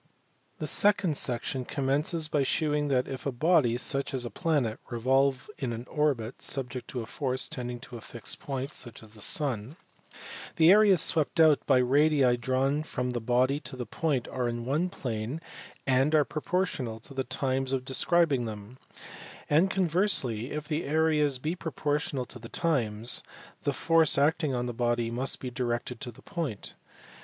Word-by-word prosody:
The - - -4
second 200 -6 +2
section 125 0 -2
commences 145 +5 0
by 150 -2 +1
shewing 150 +1 +1
that, 130 -2 +1
if 135 0 -5
a - - 0
body 135 -3 +3
(such 135 +2 0
as 125 -2 -2
a 120 - -5
planet) 140 - 0
revolve 130 +3 +1
in 130 -3 -2
an 115 +2 -6
orbit 135 -6 -1
subject 125 -2 -3
to 125 - -4
a - - -6
force 130 +1 -1
tending 125 -1 -5
to 120 - -9
a - - -11
fixed 115 0 -6
point 135 0 -4
(such 120 -2 -7
as 110 - -13
the 105 0 -13
sun), 130 0 +1 0.8
the 165 +1 +6
areas 200 -4 +6
swept^o.uJLJt 155 -1 +4
yJ^dii 135 0 +4
drawja.4foca 130 +1 -1
fee 120 - -1
body 125 +4 +2
t 130 - -7
the 125 - -4
pom^rejrj^pjia 130 - -1
plaiie 120 - -4 0.5
and 135 +3 +3
are 150 -2 +4
p/ojgortional 155 -8 -2
to - - -10
the 135 -1 -1
times_of 130 0 -1
jles 140 0 +2
them; 110 +4 -9 0.7
and 165 +6 +4
conversely, 170 - +1
if 150 0 -4
the 155 +1 -1
areas 150 -2 +2
be 150 +6 -2
proportional 150 -5 -2
to 120 - -6
the 115 0 -10
times, 120 -8 +1 0.4
the 145 - 0
force 165 +1 +3
acting 145 -1 +2
on 120 0 -1
the 120 - -3
body 120 0 0
musf 125 +3 -1
be 125 - -5
directed: 120 -1 -3
ttr 125 - -5
the - - -17
point. 155 - -5
135 Hz, 160 wpm, -28 LUFS, 120-150 Hz, 0.8 s, the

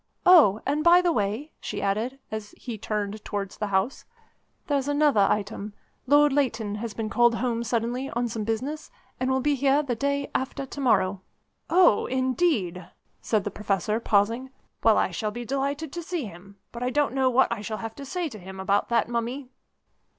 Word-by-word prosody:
Oh! 295 - +7
and, 295 +2 0
by 345 +1 +7
the 355 -1 +2
way," 220 +5 -2
she - - -5
added, 220 +7 -1
as 215 -1 -6
he 240 -3 -6
turned 210 0 -4
towards 200 -2 -4
the 210 - -2
house, 200 +6 0 0.6
"there's 280 -2 0
another 290 -8 +3
item. 210 0 -2 0.3
Lord 290 +1 +5
Leighton 230 -7 0
has 230 -3 -5
been 225 -1 -3
called 240 +1 +3
home 235 -1 -1
suddenly 240 +3 -1
on 240 +1 -1
some 220 -1 -4
business, 260 +8 -3 0.3
and 255 - 0
will 265 0 +1
be 290 +2 +2
here 280 +2 +2
the 260 -4 -2
day 280 +3 -1
after 265 +1 -2
to 280 +2 -7
morrow." 195 -7 +2 0.5
"Oh! 350 - +4
indeed," 255 - 0 0.3
said 215 -3 0
the 205 - -3
Professor, 210 +1 -1
pausing. 230 +4 +1 0.3
"Well, 225 -1 +5
I - - +1
shall 210 +5 -2
be 240 +3 -6
delighted 280 +3 -2
to 345 - -4
see 335 -4 -3
him 195 +1 -12
but 235 - -8
I 250 - 0
don't 290 -1 +1
know 265 -1 +2
what 255 0 +3
I 230 -3 -2
shall 215 +1 -4
have 225 0 -6
to 280 - -7
say 345 +5 -3
to 215 -5 -10
him 190 +1 -10
about 195 +1 +1
that 230 -2 +2
Mummy." 240 +3 -3
235 Hz, 190 wpm, -26 LUFS, 210-280 Hz, 0.6 s, Oh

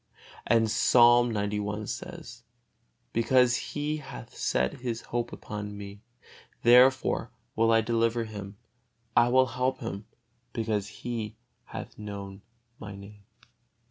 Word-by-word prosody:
And 115 0 +4
Psalm 120 +1 +5
xci 105 0 -2
says, 115 +1 -7 0.7
"Because 125 +1 +4
he 150 +3 -3
hath 60 - -10
set 65 - 0
his 120 -2 -3
hope 120 0 -3
upon 105 -1 -6
Me, 100 0 -9 0.6
therefore 125 +2 +5 0.3
will 115 0 +3
I 115 0 +5
deliver 115 +1 +1
him: 100 -2 -8 0.6
I 120 +1 +5
will 130 +1 +5
help 125 +1 -1
him, 110 -5 -6 0.5
because 110 -3 -1
he 115 -2 -5 0.3
hath - - -8
known 100 -2 -7 0.4
My 105 -2 -8
Name." 100 +1 -13
115 Hz, 115 wpm, -28 LUFS, 105-120 Hz, 0.7 s, Psalm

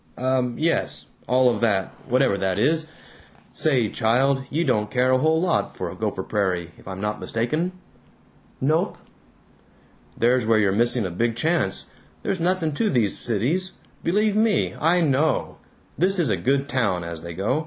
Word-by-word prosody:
Um. 130 -1 0
Yes. 165 +2 0 0.2
All 125 +1 +4
of 120 -3 +1
that, 100 -5 +1 0.2
whatever 130 -4 +3
that 95 -2 -1
is.... 155 +7 +1 0.6
Say, 130 -8 +2
child, 130 +6 +1
you 165 +4 0
don't 105 -6 +1
care 130 0 +2
a 130 - +4
whole 160 +3 +2
lot 175 -1 0
for - - -4
Gopher - - -3
Prairie, 90 -5 -1
if - - -17
I'm 95 0 -6
not 105 +1 -2
mistaken." 155 +10 -1 0.9
"Nope." 155 +6 +1 1.2
"There's 125 +1 +3
where 115 -1 +4
you're 105 -3 +3
missing 120 +2 +1
a 90 - -3
big 115 +6 0
chance. 155 - 0 0.4
There's 190 - -1
nothing 170 -2 0
to 215 +9 0
these 115 -7 +1
cities. 140 - -1 0.3
Believe 210 +4 +1
me, 215 -1 +2
I 170 +3 +3
KNOW! 150 -1 +1 0.4
This 190 +3 +3
is 165 -8 +1
a 105 - +2
good 135 +10 0
town, 105 -10 0
as 85 -1 -6
they 85 0 -8
go. 100 - 0
130 Hz, 165 wpm, -23 LUFS, 105-160 Hz, 1.2 s, All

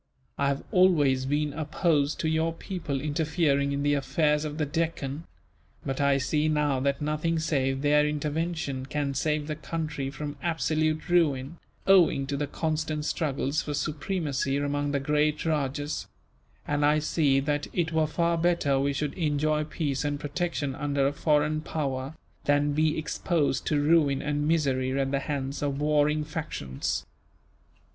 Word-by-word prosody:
I 140 - +2
have 140 0 -1
always 145 -8 +4
been 145 +1 0
opposed 155 -1 0
to 160 - 0
your 160 +1 +1
people 165 -6 -4
interfering 145 -1 +1
in 140 0 -1
the 145 0 +3
affairs 150 +2 +1
of 150 0 -5
the 155 - 0
Deccan; 160 -1 -2 0.6
but 135 +1 -2
I 140 -1 +4
see 150 +3 +1
now 150 -3 +1
that 140 +2 0
nothing 155 +2 0
save 135 -4 0
their 150 0 +4
intervention 150 -2 -2
can 140 -1 -1
save 150 +2 0
the 155 0 -3
country 150 -2 -4
from 145 +1 -6
absolute 155 -1 0
ruin, 160 -4 +1 0.3
owing 175 -8 +5
to 140 +1 -3
the 145 +1 -2
constant 155 0 -2
struggles 140 -2 -1
for 145 - -4
supremacy 145 -2 -1
among 145 0 -1
the 140 - +1
great 150 +2 +1
rajahs; 145 -1 -1 0.6
and 145 0 0
I 150 +1 +4
see 150 -2 +2
that 145 +1 -1
it 170 -2 -1
were 160 -1 +2
far 170 +1 0
better 165 -5 +2
we 140 +1 +1
should 145 0 -2
enjoy 150 -1 0
peace 145 -4 -2
and 145 -1 -1
protection, 150 -2 -2
under 140 0 0
a 140 - +1
foreign 150 0 +1
power, 140 -2 -3 0.3
than 145 0 +2
be 155 +1 +2
exposed 155 -2 -1
to 150 - +2
ruin 145 -2 +3
and 145 0 -1
misery 135 -4 +1
at 135 0 0
the 140 - +1
hands 140 -1 -3
of 140 -1 -1
warring 150 0 +2
factions. 150 - -4
150 Hz, 155 wpm, -27 LUFS, 140-155 Hz, 0.6 s, owing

